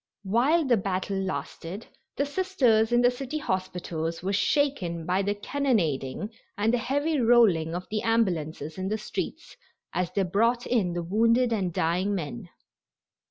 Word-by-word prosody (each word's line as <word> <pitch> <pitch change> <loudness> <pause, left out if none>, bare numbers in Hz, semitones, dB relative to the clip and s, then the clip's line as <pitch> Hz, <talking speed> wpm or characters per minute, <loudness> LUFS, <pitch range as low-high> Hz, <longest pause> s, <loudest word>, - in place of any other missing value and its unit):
While 260 - +2
the 245 -3 +4
battle 195 0 -2
lasted 190 +1 -5 0.3
the 280 - 0
Sisters 275 -10 +2
in 240 0 +4
the 245 - +5
city 265 +4 -5
hospitals 180 - -3
were 195 +2 -1
shaken 195 - 0
by 185 +3 +1
the 205 +1 -1
cannonading 205 - -1 0.3
and 215 +3 +2
the 245 - +2
heavy 285 +5 0
rolling 215 -9 +4
of 180 +1 -4
the 215 -1 0
ambulances 175 -9 -1
in 185 - -2
the 215 +2 -1
streets 215 - -5 0.4
as 180 -1 -1
they 200 - +1
brought 230 +7 +1
in 205 -8 +1
the 175 0 -2
wounded 230 +6 +2
and 190 -5 -1
dying 180 +5 0
men. 180 +3 -5
205 Hz, 155 wpm, -27 LUFS, 180-240 Hz, 0.4 s, the